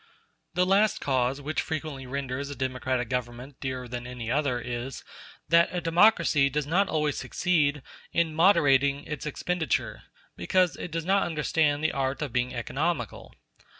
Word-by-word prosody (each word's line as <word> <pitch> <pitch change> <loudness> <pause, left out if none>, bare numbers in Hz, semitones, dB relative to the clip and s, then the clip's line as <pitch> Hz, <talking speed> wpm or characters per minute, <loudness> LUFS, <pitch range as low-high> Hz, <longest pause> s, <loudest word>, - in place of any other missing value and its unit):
The 180 +1 +3
last 200 +3 +3
cause 130 0 0
which 145 0 -1
frequently 150 -4 -5
renders 140 +1 -4
a 140 - -6
democratic 130 -1 -2
government 125 +2 -5
dearer 130 -2 -4
than 120 0 -6
any 120 -2 -5
other 140 -3 +1
is, 120 +1 -5 0.4
that 170 0 +5
a 180 - -2
democracy 165 -4 +4
does 150 +1 -1
not 185 +7 +2
always 150 -2 0
succeed 150 -6 0 0.3
in 165 -2 +1
moderating 145 -5 +4
its 150 -1 -5
expenditure, 175 +3 -2 0.3
because 185 -3 +1
it - - -6
does 165 0 -4
not 195 +2 +3
understand 155 -2 +1
the 160 - +2
art 135 +1 -2
of 140 -6 -5
being 125 0 0
economical. 135 - -3
145 Hz, 150 wpm, -27 LUFS, 130-165 Hz, 0.4 s, that